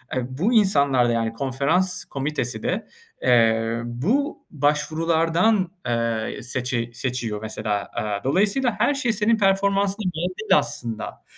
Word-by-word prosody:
eee, 130 -2 -1
bu 170 - 0
insanlar 140 - +4
da - - +1
yani, 115 -1 -1
konferans 140 +9 0
komitesi 135 -5 -3
de, 205 +5 -2 0.4
eee, 115 -1 +3
bu 200 - -1
başvurulardan, 165 +6 +1 0.2
eee, 115 -2 -1
seçi 125 -1 -2
seçiyor 120 -4 -3
mesela. 110 -2 -3
Iıı, 105 -2 -3
dolayısıyla 210 - +2
her - - +3
şey 255 -5 0
senin 220 +2 +2
performansına 200 +1 +1
göre 180 +3 -2
değil 215 - +4
aslında. 115 -3 -5
140 Hz, 125 wpm, -23 LUFS, 115-195 Hz, 0.4 s, insanlar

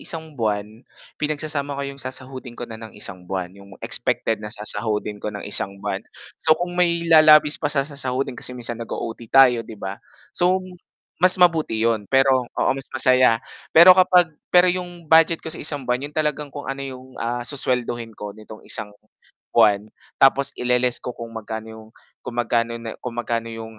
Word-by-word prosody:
isang 160 -1 -4
buwan, 105 -6 -1 0.6
pinagsasama 150 -2 -2
ko 140 - -3
'yong 140 0 -7
sasahudin 130 -1 -6
ko 120 - -5
na 115 -1 -10
ng 110 -2 -11
isang 90 -3 -5
buwan, 95 -2 -4
'yong 100 -1 -15
expected 110 -1 0
na 105 - -6
sasahudin 105 -1 -2
ko - - -4
ng 105 -1 -7
isang 100 -1 0
buwan. 100 - -4 0.4
So 155 0 +4
kung 175 +2 -4
may 170 -1 +1
lalabis 155 -2 +6
pa 145 - 0
sa 140 -2 +1
sasahudin 135 -2 -2
kasi 125 +1 -4
minsan 120 -1 -4
nag-o-OT 115 0 -6
tayo, 125 -3 +5
'di 110 -1 -10
ba. 95 0 -7 0.3
So 185 +2 +1 0.6
mas 185 +1 +7
mabuti 165 -10 +3
iyon 110 -3 0
pero 135 -2 +3
oo, - - -1
mas 135 0 -7
masaya. 130 -2 +4 0.3
Pero 170 +3 +10
kapag 180 -2 +4 0.2
pero 180 0 +5
'yong 175 -1 -6
budget 160 +1 +4
ko 160 - 0
sa - - -4
isang 145 -2 0
buwan 125 0 -1
'yon 150 - -22
talagang 150 -1 -1
kung, 145 +1 -9
ano, 135 0 -5
'yong, 130 -1 -9
ah, 120 +1 -3
suswelduhin 120 -4 -2
ko 105 -1 -7
nitong 110 +1 -13
isang 105 - -3 0.7
buwan, 105 0 +4 0.3
tapos 135 0 +4
ile-less 125 0 +1
ko 125 - -7
kung 115 0 -8
magkano 110 0 -7
'yong 110 0 -12 0.4
kung 120 - -6
magkano 115 -1 0
na 115 -1 -8
kung 125 -2 -7
magkano 115 -1 -2
'yong, 115 -1 -9
125 Hz, 180 wpm, -22 LUFS, 110-150 Hz, 0.7 s, Pero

